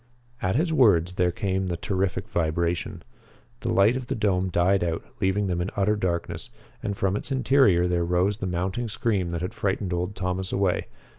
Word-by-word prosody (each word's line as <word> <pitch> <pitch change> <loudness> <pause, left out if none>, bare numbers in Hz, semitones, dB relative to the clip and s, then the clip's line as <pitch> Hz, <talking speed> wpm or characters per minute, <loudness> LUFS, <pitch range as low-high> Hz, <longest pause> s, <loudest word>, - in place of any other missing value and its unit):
At 95 +2 0
his 160 +4 +1
words 90 - +4
there 90 -1 +2
came 95 0 -1
the 85 -1 -2
terrific 95 +1 -1
vibration. 85 -3 -1 0.6
The - - -2
light 100 +5 +4
of 130 -1 -4
the - - -2
dome 95 -4 +1
died 90 +2 +2
out, 85 -1 -2
leaving 95 +2 +1
them 90 -2 -1
in 90 - -2
utter 100 +2 +2
darkness, 90 -4 -2 0.3
and 100 -1 -3
from 95 0 +1
its 120 +6 -4
interior 130 -9 +4
there 90 -1 +1
rose 90 +4 +1
the 95 - -3
mounting 95 +7 -2
scream 100 -4 -1
that 85 -1 -3
had 90 - -4
frightened 95 -2 -1
old 90 +3 -2
Thomas 95 0 -2
away. 95 -2 0
95 Hz, 190 wpm, -25 LUFS, 90-105 Hz, 0.6 s, words